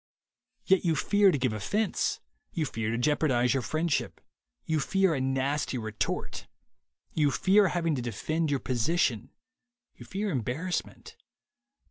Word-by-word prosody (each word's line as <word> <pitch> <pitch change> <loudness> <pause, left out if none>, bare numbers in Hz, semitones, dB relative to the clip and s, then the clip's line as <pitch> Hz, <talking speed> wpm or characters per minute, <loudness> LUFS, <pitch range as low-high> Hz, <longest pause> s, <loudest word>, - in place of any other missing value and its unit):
Yet 190 0 +3
you 165 -3 +2
fear 205 +6 +4
to 170 - +2
give 130 -4 0
offense; 200 - -1 0.3
you 160 - -1
fear 115 -5 -3
to 115 - -1
jeopardize 130 -2 +2
your 135 - 0
friendship; 155 +3 -1 0.5
you 160 -1 0
fear 190 +4 +2
a 135 - -1
nasty 135 +1 -1
retort; 110 -2 -3 0.7
you 150 -2 +3
fear 195 +7 +4
having 170 -3 0
to 130 - -2
defend 155 - -2
your 140 -2 0
position; 125 -2 0 0.6
you - - -13
fear 200 +1 -2
embarrassment. 140 - -3
150 Hz, 135 wpm, -28 LUFS, 125-175 Hz, 0.7 s, fear